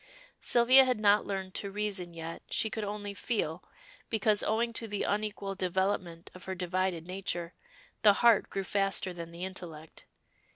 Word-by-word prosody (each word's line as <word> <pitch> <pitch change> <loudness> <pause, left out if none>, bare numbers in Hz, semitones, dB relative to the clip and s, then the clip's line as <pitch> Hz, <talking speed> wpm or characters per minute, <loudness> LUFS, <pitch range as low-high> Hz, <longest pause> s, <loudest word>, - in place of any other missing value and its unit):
Sylvia 250 +3 +6
had 255 -4 0
not 205 0 +4
learned 190 -2 -4
to 200 - -2
reason 195 -4 -3
yet, 165 0 -6
she 220 - +2
could 220 - -3
only 205 0 -4
feel, 185 -6 -2 0.5
because, 215 -1 +2
owing 230 +2 0
to 230 0 -2
the 205 -1 -2
unequal 205 -1 -2
development 185 -2 -2
of 185 - -13
her 190 - -4
divided 180 -1 -1
nature, 180 -2 -3 0.5
the 210 -2 +7
heart 230 0 +4
grew 195 - -3
faster 195 -1 0
than 170 -1 -8
the 170 +2 -5
intellect. 165 -4 -8
195 Hz, 160 wpm, -30 LUFS, 180-210 Hz, 0.5 s, the